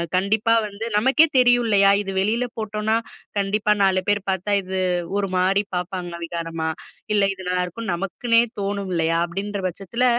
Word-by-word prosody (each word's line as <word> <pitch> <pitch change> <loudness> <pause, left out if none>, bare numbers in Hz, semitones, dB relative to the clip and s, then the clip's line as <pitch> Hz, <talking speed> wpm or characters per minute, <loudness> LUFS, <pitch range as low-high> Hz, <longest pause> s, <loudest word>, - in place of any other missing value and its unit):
கண்டிப்பா 215 +5 +2
வந்து 210 +2 -6
நமக்கே 265 +8 +5
தெரியும் 245 -1 +5
இல்லையா, 200 -2 +5
"இது 195 -1 -5
வெளியில 220 +6 +1
போட்டோம்னா 215 0 -1 0.4
கண்டிப்பா, 205 +1 +1
4 190 -1 +3
பேர் 205 -1 +2
பாத்தா 190 +2 -1
இது 190 0 -5 0.4
ஒரு 200 - 0
மாரி 190 +2 +2
பாப்பாங்க 180 -1 -4
விகாரமா, 165 -1 -4 0.5
இல்ல 205 -1 +3
இது 190 - -11
நல்லாயிருக்கும்னு" 180 +3 -2
நமக்குன்னே 230 +6 +1 0.2
தோணும் 200 -1 -3
இல்லையா, 165 0 +1
அப்படின்ற 200 +3 -4
பட்சத்தில 200 +7 -2
200 Hz, 145 wpm, -22 LUFS, 185-215 Hz, 0.5 s, நமக்கே